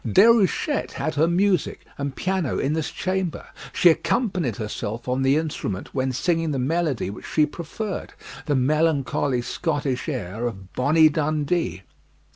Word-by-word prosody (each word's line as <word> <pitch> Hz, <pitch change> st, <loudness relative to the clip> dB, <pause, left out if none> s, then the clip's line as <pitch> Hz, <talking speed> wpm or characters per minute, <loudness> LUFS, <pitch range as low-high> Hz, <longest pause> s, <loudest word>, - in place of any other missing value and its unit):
Déruchette 230 Hz, +7 st, +3 dB
had 155 Hz, -, -2 dB
her 155 Hz, +2 st, +3 dB
music 180 Hz, 0 st, +1 dB
and 140 Hz, -1 st, -4 dB
piano 185 Hz, -7 st, -1 dB
in 140 Hz, -, 0 dB
this 160 Hz, -1 st, -1 dB
chamber; 185 Hz, -2 st, -2 dB, 0.3 s
she 175 Hz, -, +6 dB
accompanied 180 Hz, -, 0 dB
herself 110 Hz, +2 st, -5 dB
on 130 Hz, +1 st, 0 dB
the 135 Hz, +2 st, +3 dB
instrument 150 Hz, -, -3 dB
when 130 Hz, -1 st, 0 dB
singing 165 Hz, +4 st, 0 dB
the 140 Hz, -, -1 dB
melody 140 Hz, -, 0 dB
which -, -, -9 dB
she 155 Hz, -, +3 dB
preferred 175 Hz, +7 st, -5 dB, 0.4 s
the 145 Hz, -, +2 dB
melancholy 140 Hz, -2 st, +1 dB
Scottish 145 Hz, -1 st, -2 dB
air 115 Hz, -, -3 dB
of 95 Hz, -5 st, -8 dB
"Bonnie 155 Hz, +4 st, +5 dB
Dundee." 150 Hz, -, -1 dB
150 Hz, 140 wpm, -24 LUFS, 130-170 Hz, 0.4 s, she